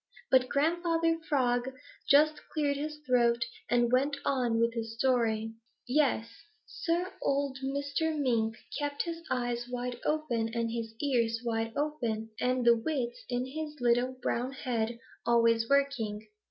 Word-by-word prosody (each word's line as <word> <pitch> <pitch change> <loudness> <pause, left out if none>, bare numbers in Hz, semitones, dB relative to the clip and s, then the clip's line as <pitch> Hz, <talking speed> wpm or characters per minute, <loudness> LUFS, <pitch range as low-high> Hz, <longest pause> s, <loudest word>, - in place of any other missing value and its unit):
But 255 -1 +5
Grandfather 330 +2 +1
Frog 255 -2 +1 0.3
just 300 +2 +5
cleared 290 -2 +1
his 300 +2 -4
throat 235 -2 +3 0.2
and 240 0 +3
went 275 +3 +2
on 245 -4 +1
with 230 0 +2
his 225 -1 -4
story. 225 -3 +1 0.3
"Yes, 255 -4 +2 0.4
Sir, 350 +2 -2
old 275 -1 0
Mr. 285 +4 -1
Mink 230 -5 +1 0.2
kept 290 -1 -1
his 335 -1 -5
eyes 245 -1 -1
wide 245 0 -4
open 250 -8 0
and 230 -1 0
his 225 -1 -4
ears 230 -5 +1
wide 225 -1 -1
open 235 -7 -2
and 250 0 +1
the 235 0 +7
wits 240 -1 -3
in 245 0 -1
his 300 +2 -6
little 245 +1 +2
brown 250 +3 -1
head 235 -3 -2 0.3
always 230 -1 +3
working. 235 -7 +1
250 Hz, 140 wpm, -30 LUFS, 235-285 Hz, 0.4 s, the